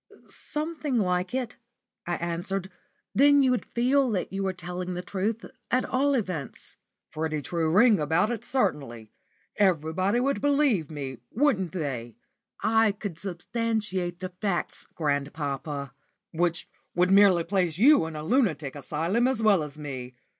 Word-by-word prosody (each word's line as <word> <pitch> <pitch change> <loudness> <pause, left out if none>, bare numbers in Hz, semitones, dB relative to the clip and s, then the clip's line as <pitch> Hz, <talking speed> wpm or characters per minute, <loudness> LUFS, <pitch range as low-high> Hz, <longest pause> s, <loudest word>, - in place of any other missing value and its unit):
"Something 305 -3 -3
like 180 -3 0
it," 255 -3 -3 0.5
I 175 - 0
answered. 175 +3 -3 0.4
"Then 285 +1 +6
you 260 - +3
would 250 - 0
feel 260 +3 +2
that 195 -3 -2
you 195 - -2
were 190 -1 0
telling 180 0 -5
the 180 - -4
truth, 205 +5 -2 0.2
at 255 +1 +2
all 275 +2 +1
events." 185 - -4 0.3
"Pretty 155 -1 -2
true 160 +2 -1
ring 210 +3 +5
about 160 +9 +2
it, 235 - -4
certainly. 120 - -2 0.5
Everybody 185 +3 +2
would 275 +2 0
believe 280 - +2
it, 135 -5 -6
wouldn't 220 - +1
they?" 125 - -4 0.5
"I 220 -1 +3
could 200 -5 -6
substantiate 190 -1 -2
the 185 - -3
facts, 195 -5 -2
grandpapa." 145 -2 -2 0.4
"Which 170 0 0 0.3
would 180 +1 +3
merely 195 -3 +6
place 180 -3 0
you 260 - +6
in 160 - -7
a 150 - -5
lunatic 160 - +1
asylum 165 - 0
as 260 -4 0
well 205 -5 +5
as 150 -1 -7
me. 130 -4 -7
185 Hz, 145 wpm, -27 LUFS, 160-230 Hz, 0.5 s, Then